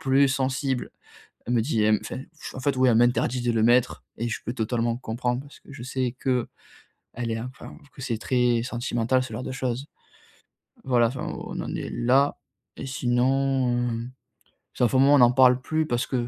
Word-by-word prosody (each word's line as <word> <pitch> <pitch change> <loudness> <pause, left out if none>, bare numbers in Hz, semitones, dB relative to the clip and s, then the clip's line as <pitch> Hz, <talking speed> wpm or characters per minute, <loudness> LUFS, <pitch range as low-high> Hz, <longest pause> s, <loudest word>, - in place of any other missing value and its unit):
plus 135 +1 +4
sensible 135 -1 -1 0.6
elle 120 - -1
me 115 - +3
dit 115 -3 0
elle 105 0 +4
me - - -15
fait 130 - -7 0.3
en 130 - -7
fait 140 +1 0
oui 130 0 +4
elle 115 - +4
m'interdit 120 +1 +2
de 120 -1 +1
le 110 -1 +1
mettre. 120 +1 +3
Et 120 +2 -2
je 115 - -3
peux 120 - -3
totalement 115 0 -1
comprendre 125 +1 -2
parce 145 +1 -15
que - - -15
je 135 -4 -9
sais 130 -1 -2
qu'elle 125 -3 +1 0.9
est 115 0 -2
enfin, 125 +2 -9 0.2
que - - -13
c'est 115 -4 -2
très 120 +1 +1
sentimental 120 +1 0
ce 115 - -9
genre 120 +4 -4
de - - -5
choses. 130 +1 -3 1.0
Voilà, 120 -3 +3
enfin 130 +3 -5
on - - -6
en - - -5
est - - -4
là 135 +4 +2 0.4
et - - -6
sinon, 130 0 +1
heu, 115 +1 -4 0.7
ça 125 - +3
fait 130 - +1
un - - +4
moment 140 +2 +6
on 135 - +5
en 120 0 +7
parle 125 0 +5
plus 155 +3 -1
parce 120 0 0
que 120 -2 -2
125 Hz, 205 wpm, -25 LUFS, 120-130 Hz, 1.0 s, en